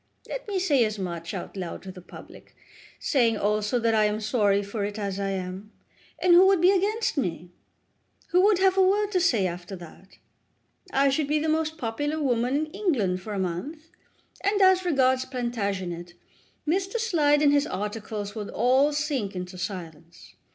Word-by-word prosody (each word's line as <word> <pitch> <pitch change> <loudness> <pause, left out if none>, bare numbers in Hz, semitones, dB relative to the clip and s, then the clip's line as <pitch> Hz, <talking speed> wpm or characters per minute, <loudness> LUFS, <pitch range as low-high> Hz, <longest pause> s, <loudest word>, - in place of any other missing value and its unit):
Let - - -6
me 405 -2 -2
say 300 -9 +3
as 215 -1 -2
much, 170 -3 -5
out - - -6
loud 180 -3 -6
to 190 - -7
the 180 -1 -12
public, - - -14 0.4
saying 235 -6 +2
also 210 +3 0
that 230 -1 +1
I 215 -1 +4
am 210 0 0
sorry 205 -2 +1
for 200 +1 -4
it, 205 +1 -4
as 200 -2 -3
I 195 0 -1
am, 190 +2 -5 0.5
and 360 -1 +4
who 365 +2 +8
would 385 -2 +4
be 360 +3 +5
against 410 +1 0
me? 175 - -3 0.8
Who 360 - +4
would 405 0 +4
have 380 0 +3
a - - +6
word 405 +2 +2
to 370 - +2
say 250 - +2
after 180 +2 -5
that? 180 +2 -14 0.7
I 275 +1 +3
should 280 +1 0
be 300 +1 +1
the 310 +1 -1
most 315 0 0
popular 290 +4 -2
woman 250 -2 +1
in 310 - -16
England 235 - 0
for 210 +3 -6
a - - -3
month, 280 - -5 0.5
and, 405 +1 +1
as 375 -1 +5
regards 260 -5 +2
Plantagenet, 200 -9 -4 0.5
Mr. 380 +6 0
Slide 305 -10 +2
and 290 -1 +5
his 290 +1 +2
articles 205 +1 -4
would 215 -2 -6
all 260 +5 +3
sink 285 -10 -2
into 180 +1 -6
silence. 170 -3 -8
235 Hz, 180 wpm, -26 LUFS, 195-315 Hz, 0.8 s, who